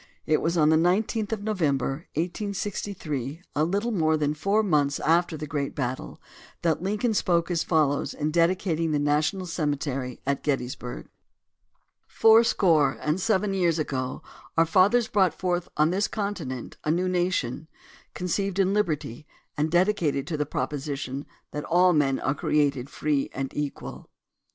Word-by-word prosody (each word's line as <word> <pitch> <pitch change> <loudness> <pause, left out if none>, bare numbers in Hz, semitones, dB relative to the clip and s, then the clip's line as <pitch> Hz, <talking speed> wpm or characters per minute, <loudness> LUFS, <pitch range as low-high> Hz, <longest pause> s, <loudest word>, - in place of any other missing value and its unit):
It 155 - +2
was 170 +1 0
on 155 -1 +4
the 160 - +5
19th 205 +6 +1
of 215 -2 -3
November, 155 - -1
1863, 175 - -3
a 150 - +2
little 200 +8 0
more 160 -6 +2
than 150 -1 0
four 200 +8 +1
months 145 -7 +1
after 165 0 +2
the 150 - -5
great 145 -2 -3
battle, 130 -2 -4 0.4
that 165 -2 +1
Lincoln 210 +5 0
spoke 175 -3 +1
as 170 -2 +1
follows 150 -4 +1
in 150 0 -1
dedicating 170 -1 +1
the - - +2
National 150 +6 +1
Cemetery 140 -6 -2
at 140 +1 0
Gettysburg: 125 -3 -3 1.0
Fourscore 195 - +4
and 155 +5 -1
seven 210 -2 +1
years 175 -4 +2
ago 130 -2 -3 0.3
our 165 - +5
fathers 200 +8 +4
brought 190 -6 +2
forth 180 -1 -2
on 155 +2 +3
this 195 +3 +1
continent 180 - -4
a - - -2
new 175 +4 +1
nation, 175 -6 -1 0.5
conceived 185 +2 -2
in 195 0 +2
liberty, 155 - -2 0.3
and 150 +2 0
dedicated 175 -6 +1
to 170 - -3
the 150 -1 -1
proposition 140 -2 -4 0.2
that 150 - -4
all 180 +1 +4
men 140 -4 +2
are 135 - +1
created 140 -3 0
free 150 -3 -1
and 135 0 -4
equal. 145 -1 -5
160 Hz, 150 wpm, -26 LUFS, 145-185 Hz, 1.0 s, the